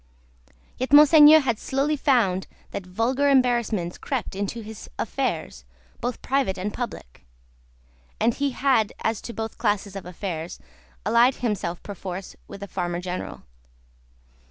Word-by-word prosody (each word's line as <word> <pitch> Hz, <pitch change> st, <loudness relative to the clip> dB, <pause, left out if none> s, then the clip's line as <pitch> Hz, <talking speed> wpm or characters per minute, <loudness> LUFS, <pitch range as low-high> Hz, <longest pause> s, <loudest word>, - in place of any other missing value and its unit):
Yet, 255 Hz, +2 st, -2 dB
Monseigneur 300 Hz, +1 st, +9 dB
had 235 Hz, -5 st, -1 dB
slowly 280 Hz, +3 st, 0 dB
found 235 Hz, -11 st, +2 dB, 0.2 s
that 185 Hz, -, -6 dB
vulgar 245 Hz, +9 st, +1 dB
embarrassments 235 Hz, -9 st, +1 dB
crept 255 Hz, -7 st, -3 dB
into 205 Hz, +4 st, -3 dB
his 220 Hz, -1 st, -10 dB
affairs, 60 Hz, -, -3 dB, 0.4 s
both 245 Hz, 0 st, -4 dB
private 265 Hz, -8 st, 0 dB
and 200 Hz, +3 st, -3 dB
public; 235 Hz, -, -7 dB, 1.0 s
and 230 Hz, +2 st, +3 dB
he 280 Hz, +3 st, 0 dB
had, 255 Hz, -5 st, +1 dB
as 225 Hz, -2 st, 0 dB
to -, -, -7 dB
both 225 Hz, -1 st, -6 dB
classes 205 Hz, -2 st, 0 dB
of 190 Hz, -3 st, -7 dB
affairs, 175 Hz, -2 st, -5 dB, 0.5 s
allied 235 Hz, +4 st, +4 dB
himself 200 Hz, -7 st, -3 dB
perforce 190 Hz, -2 st, -7 dB
with 200 Hz, -, -9 dB
a -, -, -6 dB
Farmer 175 Hz, -2 st, -3 dB
General. 180 Hz, 0 st, -5 dB
220 Hz, 130 wpm, -24 LUFS, 190-260 Hz, 1.0 s, Monseigneur